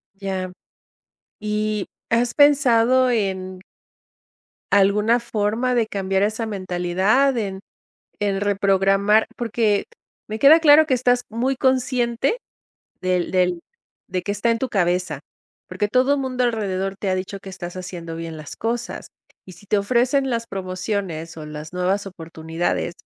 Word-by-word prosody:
Ya. 190 -2 -4 0.9
Y, 210 -1 -1 0.2
¿has 235 +1 +1
pensado 260 -3 +4
en 190 -5 -2 1.1
alguna 210 +4 +4
forma 230 +2 -1
de 230 -2 +2
cambiar 195 -1 -1
esa 220 +2 -1
mentalidad, 195 +6 +1
en 195 -3 -3 0.6
en 200 -2 0
reprogramar? 200 +1 +3
Porque 225 -3 0 0.4
me 215 +1 -4
queda 295 +7 +7
claro 310 0 +7
que 265 - +2
estás 245 0 +2
muy 250 +4 -1
consciente 255 - +1 0.6
del 180 -1 0
del 180 -2 +1 0.5
de 185 -1 -2
que 205 - -2
está 205 +3 0
en 230 - +1
tu 260 +2 -2
cabeza, 180 -2 0 0.5
porque 205 - -2
todo 260 +5 +2
mundo 255 -2 -1
alrededor, 195 -5 -1
te 200 - -3
ha 185 - +2
dicho 185 +2 -4
que 195 - -11
estás 175 -1 -7
haciendo 175 -3 -7
bien 165 -1 -6
las 155 -1 -9
cosas, 235 +1 -3 0.4
y 185 - -10
si 175 +3 -16
te 205 - +2
ofrecen 255 +6 +1
las 230 -2 -2
promociones, 185 -4 -4
o 155 - -7
las 150 +1 -8
nuevas 185 +3 -1
oportunidades, 165 -1 -3
205 Hz, 140 wpm, -22 LUFS, 185-235 Hz, 1.1 s, queda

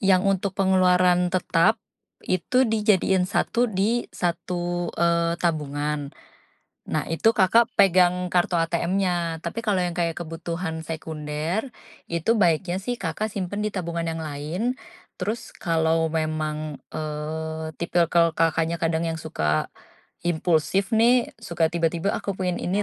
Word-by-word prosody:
yang 190 -2 +4
untuk 195 0 0
pengeluaran 180 -2 +4
tetap, 185 +4 +2 0.4
itu 250 +9 +2
dijadiin 210 -4 +2
satu 240 +4 +1
di 215 +5 0
satu, 175 0 -2
eee, 170 0 +2
tabungan, 150 -3 -1 0.8
nah - - 0
itu 165 +7 +3
Kakak, 225 +4 +4
pegang 180 -2 +4
kartu 175 0 +2
ATMnya 170 0 0
tapi 170 +7 -3
kalau 210 -4 +1
yang 175 -1 -2
kayak 170 -2 -1
kebutuhan 165 0 -4
sekunder 160 - -4 0.4
itu 170 +7 +1
baiknya 175 -3 +2
sih 245 +3 -3
Kakak, 195 +4 -3
simpan 200 +1 -3
di 210 - 0
tabungan 170 -3 -3
yang 165 - -4
lain, 160 - -3 0.4
terus 220 +5 -3
kalau 160 -3 +1
memang, 155 -2 -2
eee, 160 +1 -4
tipikal 170 -1 +2
Kakaknya, 165 0 +1
kadang 165 0 +1
yang 165 - -2
suka, 75 - -1 0.5
impulsif 175 +3 +1
nih 235 +2 +4
suka 170 -1 0
tiba-tiba 170 +3 0
aku 200 - -3
pengen 180 -2 -1
ini 195 +4 0
175 Hz, 125 wpm, -24 LUFS, 160-190 Hz, 0.8 s, yang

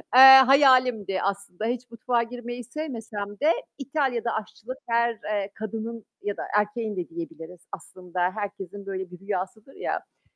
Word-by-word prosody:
Eee, 260 - +10 0.2
hayalimdi 255 -8 +4
aslında, 200 0 -3
hiç 245 +1 -3
mutfağa 235 +1 0
girmeyi 240 +1 -7
sevmesem 225 -7 -6
de 310 +3 +4 0.2
İtalya'da 270 -4 -1
aşçılık 225 +4 -6
her, 235 0 +2
eee, 205 -1 -2
kadının 225 +1 -5 0.2
ya 205 -1 -3
da - - -4
erkeğin 210 +1 -1
de 180 - -3
diyebiliriz 165 +1 -8
aslında, 180 -1 -8
herkesin 200 -1 -6
böyle 190 -2 -5
bir 180 - -11
rüyasıdır 195 +5 -5
ya. - - -2
Aaa, - - -11
220 Hz, 145 wpm, -26 LUFS, 195-245 Hz, 0.2 s, Eee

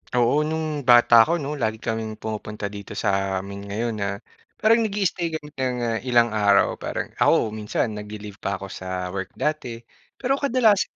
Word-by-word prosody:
Oo, 120 +4 +3
no'ng 155 -4 -3
bata 120 -1 +7
ako - - +1
'no, 145 -5 -3
lagi 110 -2 0
kaming 110 -1 -3
pumupunta 105 -1 -5
dito 100 -1 -8
sa 95 -1 0
amin 100 0 -7
ngayon 115 +3 -2
na 100 - 0 0.5
parang 225 +2 +4
nag-i-i-stay 200 -5 0
kami 150 -1 -7
ng 130 -3 -2 0.3
ilang 120 -2 +4
araw 100 -2 +3
parang - - -4
ako 110 - +3
minsan 110 +1 -2
nagli-leave 105 -1 -8
pa 100 - -2
ako 95 -1 -8
sa 90 -1 -4
work 95 0 -5
dati. 125 -7 -3 0.3
Pero 270 +2 0
kadalasan 235 -7 +2
115 Hz, 165 wpm, -24 LUFS, 100-150 Hz, 0.5 s, bata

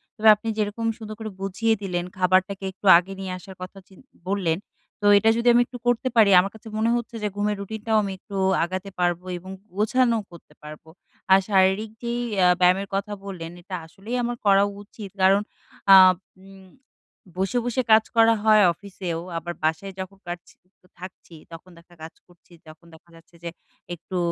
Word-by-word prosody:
তবে 220 0 +1
আপনি 220 +2 -10
যেরকম 215 +2 -2
সুন্দর 215 -1 -8
করে 220 -1 -5
বুঝিয়ে 195 +4 0
দিলেন 175 -3 -3
খাবারটাকে 190 +1 +1
একটু 190 +2 -16
আগে 185 +3 -3
নিয়ে 190 -1 -5
আসার 190 +1 -12
কথা 185 +2 -9
চিন 190 - -19 0.3
বললেন। 185 -5 0 0.4
তো - - -3
এটা 220 +2 +3
যদি 235 +1 -1
আমি 240 - +5
একটু 245 - -9
করতে 245 +2 +1
পারি 220 -3 +6
আমার 195 +2 -1
কাছে 220 +1 -14
মনে 220 +1 +1
হচ্ছে 235 -1 -5
যে - - +1
ঘুমের 210 0 -1
রুটিনটাও 220 +2 -2
আমি 195 - -4
একটু 200 - -11 0.3
আগাতে 185 +3 -4
পারবো 175 0 0
এবং 185 +2 -10 0.2
গোছানোও 230 +2 +1
করতে 170 -3 -16
পারবো। 155 +1 -11 0.4
আর 190 - +8
শারীরিক 190 +2 +2
যেই 235 0 -2 0.2
অ্যা 180 -1 +4
ব্যায়ামের 185 +2 +3
কথা 205 +1 -3
বললেন 170 -4 -7
এটা 185 +1 -7
আসলেই 200 +8 -7
আমার 240 0 -2
করা 200 0 +5 0.2
উচিত। 205 -1 -11
কারণ 195 +2 +4 0.5
আ - - +11 0.5
উম 190 -1 -16 0.7
বসে, 195 +6 -1
বসে 245 +1 0
কাজ 220 0 +7
করা 225 0 +5
হয় 215 -1 +5
অফিসেও, 185 -3 -6 0.2
আবার 175 +1 -5
বাসায় 160 +5 -1
যখন 190 +1 -7
পারছি 175 0 -8 0.3
তো 180 - -26
থাকছি। 180 -2 -12 0.2
তখন 165 +2 -12
দেখা 170 +1 -19
কাজ 160 - -9
করছি 175 0 -23
তখন 155 +2 -15
দেখা 160 +2 -19
যাচ্ছে 165 +1 -20
যে 170 - -4 0.5
একটু 175 +2 -7
195 Hz, 180 wpm, -23 LUFS, 180-215 Hz, 0.7 s, আ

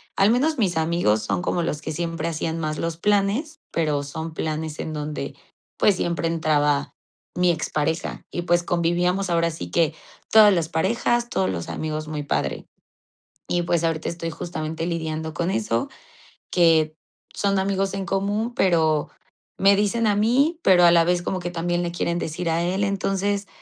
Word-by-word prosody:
al 200 +3 +4
menos 290 +5 +2
mis 185 -7 +1
amigos 160 -10 +1
son 100 -4 -1
como 175 - -1
los 150 -2 -2
que 155 - -4
siempre 165 0 -2
hacían 160 0 -3
más 155 -1 -2
los 165 -1 -2
planes, 205 - 0
pero 150 -3 0
son 160 +3 -6
planes 155 0 -3
en 160 - -4
donde, 150 -2 -4 0.4
pues 205 - +4
siempre 170 -3 -1
entraba 150 -3 +1 0.4
mi 180 -1 +3
expareja 160 0 -2
y 175 - -3
pues 175 0 +2
convivíamos 175 +2 0
ahora 170 0 +2
sí 160 - -7
que 165 -2 +2 0.4
todas 215 -2 +8
las 165 -3 0
parejas, 235 +8 +1
todos 95 0 0
los 85 -3 -4
amigos 155 -1 -4
muy 150 -1 -4
padre. - - -2 0.8
Y 175 - 0
pues 170 -1 0
ahorita 165 -1 -1
estoy 170 0 -4
justamente 160 0 -4
lidiando 160 -2 -3
con 170 +4 -1
eso, 115 - -1 0.6
que 160 -3 +3 0.4
son 200 -1 +1
amigos 195 0 0
en 195 -1 -3
común, 205 +5 -1
pero 160 -7 +2 0.5
me 195 +1 +5
dicen 220 +3 +1
a 205 - +3
mí, 275 +10 +2
pero 180 -2 +6
a 170 - +8
la 170 -1 +5
vez 175 0 +1
como 185 +1 -2
que 175 0 -4
también 175 +1 -1
le 170 -1 -2
quieren 170 0 -1
decir 165 +1 -3
a 165 +1 +1
él. 190 +3 0
Entonces, 200 0 -1
170 Hz, 175 wpm, -23 LUFS, 155-195 Hz, 0.8 s, todas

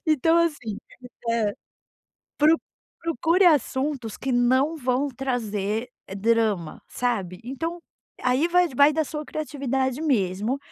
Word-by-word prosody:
Então 315 +2 +3
assim 295 -11 -1 0.5
hã. 225 -3 +1 0.9
Pro 310 +2 +5 0.4
procure 335 +4 +2
assuntos 270 - +1
que 265 - -3
não 260 +6 +3
vão 260 0 0
trazer 230 -4 -2 0.3
drama, 215 -5 0
sabe. 200 -8 -2
Então 325 +7 -4 0.4
aí 255 +6 +2
vai 360 +1 +4
d 270 - -12
vai 285 +4 +6
da 315 0 +1
sua 300 +2 -5
criatividade 270 -3 -2
mesmo, 220 - 0
260 Hz, 120 wpm, -25 LUFS, 230-305 Hz, 0.9 s, vai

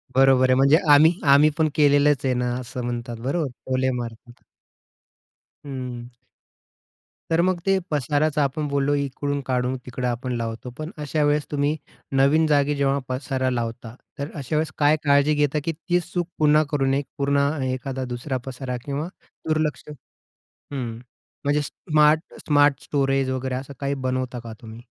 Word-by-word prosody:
बरोबर 130 -1 +5
आहे. 130 - +5
म्हणजे 140 +4 +5 0.2
आम्ही 155 +3 +7 0.2
आम्ही 150 +2 +6
पण 155 -1 +2
केलेलंच 145 -2 +4
आहे 130 - +2
ना, 125 0 -1
असं 125 0 -6
म्हणतात. 120 -1 -4
बरोबर 140 +3 -1 0.2
टोले 130 0 +1
मारतात. 120 0 -9 1.2
हं. 125 -3 -6 1.2
तर 165 +1 +4
मग 185 -1 +1
ते 195 0 +3
पसाराचं 150 +2 +1
आपण 145 +2 -1
बोललो 140 0 +1
इकडून 140 +1 -2
काढून 125 0 0
तिकडं 125 0 -3
आपण 125 +1 -2
लावतो, 115 +2 -4
पण 155 +2 -5
अशा 150 +1 -1
वेळेस 145 0 +2
तुम्ही 145 +1 +1 0.4
नवीन 140 +4 +4
जागी 145 0 +2
जेव्हा 140 0 +1
पसारा 130 0 -1
लावता, 115 -1 -4 0.2
तर 140 +2 -4
अशावेळेस 155 +3 -1
काय 150 +1 +4
काळजी 145 +1 +4
घेता 150 +1 +1
की 165 - -1
तीच 175 +2 -2
चूक 175 -2 -1
पुन्हा 150 0 +5
करू 145 -3 +1
नये. 135 +1 +2
एक 140 - -5
पूर्ण 140 0 +1 0.3
एखादा 130 0 -3
दुसरा 130 +2 -3
पसारा 130 -1 -5
किंवा 145 +3 -3 0.4
दुर्लक्ष 155 -1 0 0.7
हं. 120 -5 -7 0.5
म्हणजे 145 +1 +2
स्मार्ट 150 +1 +1
स्मार्ट 145 -2 +3
स्टोरेज 135 -2 0
वगैरे 130 0 -2
असं 135 +2 -6
काही 140 0 -1
बनवता 130 -1 -2
का 115 -1 -8
तुम्ही? 115 0 -10
140 Hz, 155 wpm, -23 LUFS, 130-150 Hz, 1.2 s, आम्ही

